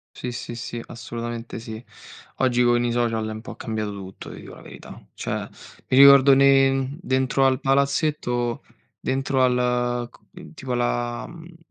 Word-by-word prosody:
Sì, 125 - -5
sì, 120 0 -6
sì, 115 0 -6
assolutamente 120 -1 -6
sì. 110 0 -8 0.6
Oggi 125 -2 +2
con 120 0 +3
i 120 - 0
social 115 -2 0
è 110 - -4
un 110 - -7
po' - - -9
cambiato 110 -2 -4
tutto, 95 -1 -9
ti - - -10
dico - - -11
la - - -14
verità. - - -12
Cioè, - - -4 0.4
mi 130 - +1
ricordo 140 0 +8
ne 135 0 +3
dentro 130 -2 +1
al 130 -1 +2
palazzetto, 135 -3 0 0.4
dentro 135 0 0
al 125 -1 0
c - - -21 0.4
tipo 130 -3 -7
alla, 120 0 -1
mhmm 170 0 -13
125 Hz, 160 wpm, -23 LUFS, 120-135 Hz, 0.6 s, ricordo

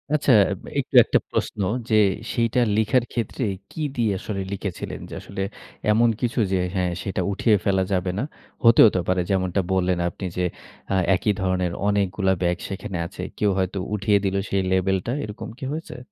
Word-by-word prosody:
আচ্ছা 145 -2 +2 0.2
আ - - 0 0.3
একটু - - -4
একটা - - +2
প্রশ্ন - - -2 0.3
যে 110 - +3 0.4
সেইটা 115 0 +1 0.2
লিখার 110 +3 +3
ক্ষেত্রে 120 +2 -2 0.3
কি 160 - -6 0.2
দিয়ে 115 -3 +2
আসলে 100 -1 -4
লিখেছিলেন? 100 -2 -5
যে - - -9
আসলে 100 0 -6 0.5
এমন 115 +2 +4
কিছু 120 -1 0
যে 95 - +2 0.2
হ্যাঁ, 90 -1 +1
সেটা 95 -1 -2
উঠিয়ে 105 +2 +3
ফেলা 95 -1 +2
যাবে 90 -1 0
না। - - 0 0.4
হতেও 115 -1 +8
তো - - +3
পারে 95 0 +2
যেমনটা 95 0 +1
বললেন, 90 -1 +1
আপনি 95 - -7
যে 90 - +1 0.5
আ - - +2 0.2
একই 105 - +1
ধরনের 90 -2 0 0.2
অনেকগুলা 95 -1 +1
ব্যাগ 90 -1 +1
সেখানে 95 -1 -5
আছে। 85 - -8 0.2
কেউ 105 - +2
হয়তো 95 +1 -1 0.2
উঠিয়ে 105 0 +3
দিলো 100 0 +1
সেই 100 - +1
লেভেলটা 95 +4 +1
এরকম 105 0 -6
কি 130 - -6
হয়েছে? 160 +2 -6
100 Hz, 175 wpm, -23 LUFS, 95-110 Hz, 0.5 s, হতেও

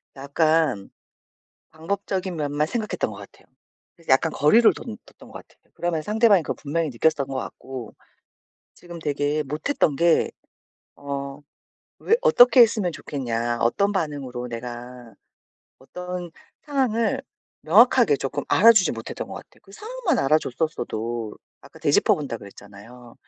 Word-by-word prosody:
약간 145 -5 0 0.8
방법적인 185 +2 -3
면만 150 -1 -1
생각했던 220 +2 -3
것 - - -10
같아요. - - -14 0.5
그래서 165 - -19
약간 145 +5 +3
거리를 220 +13 +5
둰 225 -2 -8
뒀던 - - -17
것 - - -11
같아요. - - -31
그러면 170 -2 -2
상대방이 210 -1 +3
그걸 - - -3
분명히 155 +2 -1
느꼈었던 140 +2 0
것 135 - -6
같고. 130 -2 -7 0.8
지금 175 -1 -10
되게 145 0 -1
못했던 150 - -1
게 170 +3 +2 0.6
어 140 0 -6 0.6
왜 455 - +4
"어떻게 250 - +6
했으면 215 -6 +3
좋겠냐?" 120 -6 -3
어떤 200 +13 +2
반응으로 140 -9 -4
내가 120 0 -8 0.7
어떤 180 +4 -7 0.3
상황을 245 -7 0 0.4
명확하게 225 - +5
조금 135 0 -4
알아주지 215 -4 +6
못했던 115 -1 -6
것 - - -8
같아요. - - -13
그 - - -20
상황만 430 - -2
알아줬었어도 120 -6 -1 0.2
아까 - - -16
되짚어 - - +3
본다고 140 -7 -5
그랬잖아요. 105 +4 -14
155 Hz, 315 characters per minute, -23 LUFS, 130-195 Hz, 0.8 s, 어떻게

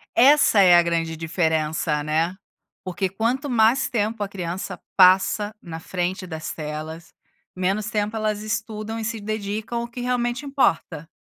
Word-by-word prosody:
Essa 275 -4 +6
é 180 -3 +7
a 175 - +6
grande 165 -1 -1
diferença, 160 -2 -1
né. 160 +4 0 0.5
Porque 185 +1 -2
quanto 235 +8 -1
mais 235 +1 +3
tempo 220 -1 -1
a - - -3
criança 180 -1 -5 0.2
passa 190 +3 +4
na 165 -2 -7
frente 180 +2 -3
das 160 -2 -5
telas, 155 +2 -7 0.4
menos 195 +3 -1
tempo 210 -1 -1
elas 215 -1 -1
estudam 215 0 -4
e 220 - -4
se 225 -1 -3
dedicam 215 +2 -3
ao 235 - -5
que 240 +1 -8
realmente 245 +1 -1
importa. 165 - 0
200 Hz, 150 wpm, -23 LUFS, 170-225 Hz, 0.5 s, é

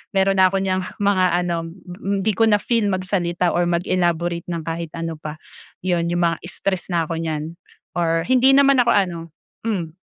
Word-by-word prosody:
meron 195 0 +3
na 185 - +7
ako 195 - 0
niyang 185 -1 0 0.2
mga 200 -2 +3 0.2
ano, 175 -1 -1 0.2
mm, 195 +2 -4
'di 215 - +2
ko 225 - +5
na 210 - +5
feel 230 -2 +1
magsalita 185 -2 0
or 175 0 +1
mag-elaborate 175 -1 0
ng 170 -2 -4
kahit 165 0 -4
ano 165 -1 -4
pa, 155 -1 -6 0.5
'yon 175 -2 0
'yong 175 0 +1
mga 165 0 +1
stress 190 +1 -3
na 170 -1 +1
ako 165 0 -4
niyan 160 0 -4 0.4
or 165 -1 +1
hindi 260 +3 +5
naman 275 -1 +5
ako 240 -1 +4
ano, 180 -4 +1 0.5
hmm. 175 -7 -2
175 Hz, 185 wpm, -21 LUFS, 170-195 Hz, 0.5 s, na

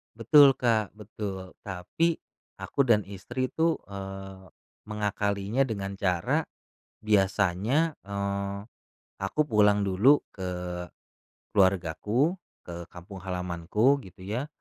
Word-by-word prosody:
Betul 135 +4 +7
Kak, 110 -4 +1
betul. 100 -3 -6
Tapi, 105 - -1 0.4
aku 140 -2 -1
dan 105 -3 +4
istri 120 +7 -4
tuh, 165 0 +2
eee, 95 -1 -8 0.4
mengakalinya 105 +3 0
dengan 100 -3 -3
cara 90 -4 +1 0.7
biasanya, 105 - +2
eee, 100 0 -3 0.6
aku 95 +10 -2
pulang 105 -6 +3
dulu 100 +10 +4
ke 90 -2 -5 0.9
keluargaku, 100 - +2 0.2
ke 85 -1 -8
kampung 90 +2 -11
halamanku 90 +8 +1
gitu 95 0 -14
ya, 115 +9 -3
100 Hz, 100 wpm, -28 LUFS, 95-115 Hz, 0.9 s, Betul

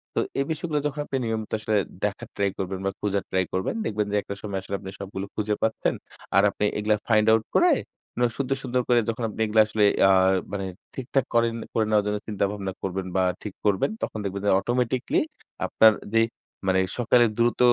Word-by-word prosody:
তো - - +2 0.2
এই 140 - +1
বিষয়গুলো 155 -1 -1
যখন 150 +1 -6
আপনি 135 - -2
নিয়মিত 110 -1 -3
আসলে 110 0 -1 0.3
দেখার 105 -1 -2
ট্রাই 100 -1 +1
করবেন 95 0 -3
বা 95 - +1
খুঁজার 100 -1 0
ট্রাই 95 0 +2
করবেন 95 - -1
দেখবেন 105 -1 0
যে 105 - +2
একটা 100 - -6
সময় 100 -2 -3
আসলে 100 +1 -4
আপনি 95 - -8
সবগুলো 100 0 -5
খুঁজে 105 0 0
পাচ্ছেন। 110 0 +1 0.4
আর 100 - +6
আপনি 105 - -1
এগুলা 105 +1 +2
ফাইন্ড 110 -2 +4
আউট 110 0 +4
করে 350 0 +6 0.7
সুন্দর, 135 -1 0
সুন্দর 125 -1 0
করে 120 -1 +5
যখন 115 +1 -3
আপনি 110 - -10
এগুলা 110 0 +4
আসলে 110 -1 +2 0.2
আ - - +7 0.4
মানে 100 -1 -3 0.3
ঠিকঠাক 130 +1 -1
করেন 115 -1 +3 0.2
করে 110 - +2
নেওয়ার 105 -1 +3
জন্য 105 0 0
চিন্তাভাবনা 100 -2 -2
করবেন 95 0 -2
বা 95 - +3 0.2
ঠিক 105 - -5
করবেন 100 -2 +2
তখন 110 - -3
দেখবেন 100 0 -3
যে 100 - +3
অটোমেটিকলি 120 +4 0 0.5
আপনার 110 - +6 0.2
যে 115 - +5 0.5
মানে 95 0 +3 0.2
সকালে 120 0 +4
দ্রুত 120 0 +2
105 Hz, 195 wpm, -25 LUFS, 100-120 Hz, 0.7 s, আ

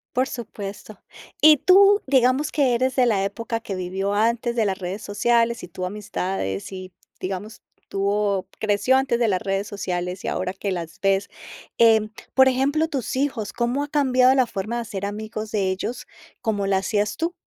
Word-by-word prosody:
Por 255 +1 +2
supuesto. 205 -3 -8 0.4
Y 305 0 +8
tú, 395 +6 +6
digamos 265 +2 +2
que 270 -5 +2
eres 260 +2 0
de 255 -2 +4
la 205 -5 +2
época 230 +3 -3
que 200 - -5
vivió 190 +2 -2
antes 235 +3 +1
de 225 - +3
las 190 -1 -1
redes 190 +2 -5
sociales 230 +3 +1
y 180 - -8
tus 180 +1 -5
amistades 185 - -4
y, 185 0 -8 0.3
digamos, 195 +4 -5 0.3
tuvo 200 -1 0
creció 215 +5 +2
antes 265 -3 +1
de 235 - +3
las 185 -3 0
redes 195 +1 -2
sociales 180 -2 -4
y - - -4
ahora 185 - -2
que 195 0 -4
las 165 -3 -5
ves, 195 0 +1 0.5
eh, 225 -1 +6 0.3
por 265 0 +6
ejemplo, 285 +5 +1
tus 270 -5 -3
hijos, 255 -7 -2
¿cómo 245 +4 0
ha - - -5
cambiado 260 -3 +4
la 260 -2 +3
forma 215 +2 -4
de - - -1
hacer 200 -4 -5
amigos 215 +1 -5
de 195 -3 0
ellos, 210 +6 -4 0.3
como 205 -3 -1
la 195 -1 +2
hacías 205 +2 0
tú? 330 +2 -1
215 Hz, 180 wpm, -23 LUFS, 195-250 Hz, 0.5 s, Y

